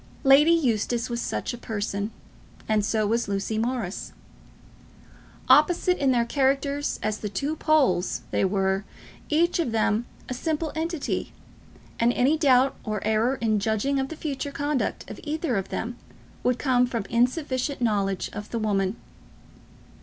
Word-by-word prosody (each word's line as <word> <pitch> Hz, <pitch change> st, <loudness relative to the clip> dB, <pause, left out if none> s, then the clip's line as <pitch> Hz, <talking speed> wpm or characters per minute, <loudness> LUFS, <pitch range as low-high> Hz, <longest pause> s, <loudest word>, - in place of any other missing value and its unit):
Lady 275 Hz, +3 st, +7 dB
Eustace 240 Hz, -6 st, +1 dB
was 235 Hz, 0 st, -2 dB
such -, -, -3 dB
a 240 Hz, -, -7 dB
person, 205 Hz, -2 st, -3 dB, 0.6 s
and 215 Hz, -1 st, +2 dB
so 215 Hz, +1 st, +1 dB
was 230 Hz, +2 st, 0 dB
Lucy 200 Hz, +2 st, -1 dB
Morris. 230 Hz, -5 st, -3 dB, 1.3 s
Opposite 360 Hz, 0 st, +4 dB
in 275 Hz, -2 st, +3 dB
their 240 Hz, -2 st, +2 dB
characters 280 Hz, +2 st, 0 dB
as 215 Hz, 0 st, -1 dB
the 210 Hz, -, -4 dB
two 280 Hz, +10 st, -2 dB
poles, 275 Hz, -, +2 dB
they -, -, +1 dB
were, 190 Hz, 0 st, +1 dB, 0.5 s
each 340 Hz, +3 st, +2 dB
of 315 Hz, -8 st, 0 dB
them, 220 Hz, +1 st, +1 dB, 0.2 s
a -, -, -3 dB
simple 315 Hz, +4 st, -2 dB
entity; 325 Hz, -1 st, -2 dB, 0.7 s
and 235 Hz, +1 st, +4 dB
any 270 Hz, +5 st, +3 dB
doubt 270 Hz, -4 st, +4 dB
or 215 Hz, -2 st, -3 dB
error 220 Hz, +4 st, +2 dB
in 215 Hz, -2 st, +2 dB
judging 220 Hz, +7 st, 0 dB
of 265 Hz, 0 st, -2 dB
the 320 Hz, -, -6 dB
future 285 Hz, -2 st, -4 dB
conduct 285 Hz, -1 st, -2 dB
of -, -, -8 dB
either 310 Hz, -4 st, -1 dB
of 195 Hz, -1 st, -2 dB
them 240 Hz, +2 st, -4 dB, 0.4 s
would 250 Hz, -1 st, +1 dB
come 250 Hz, -2 st, +2 dB
from 230 Hz, -5 st, -3 dB
insufficient 255 Hz, +2 st, 0 dB
knowledge 200 Hz, -5 st, 0 dB
of 210 Hz, 0 st, -7 dB
the 235 Hz, -, -3 dB
woman. 200 Hz, -2 st, 0 dB
245 Hz, 150 wpm, -25 LUFS, 215-280 Hz, 1.3 s, Lady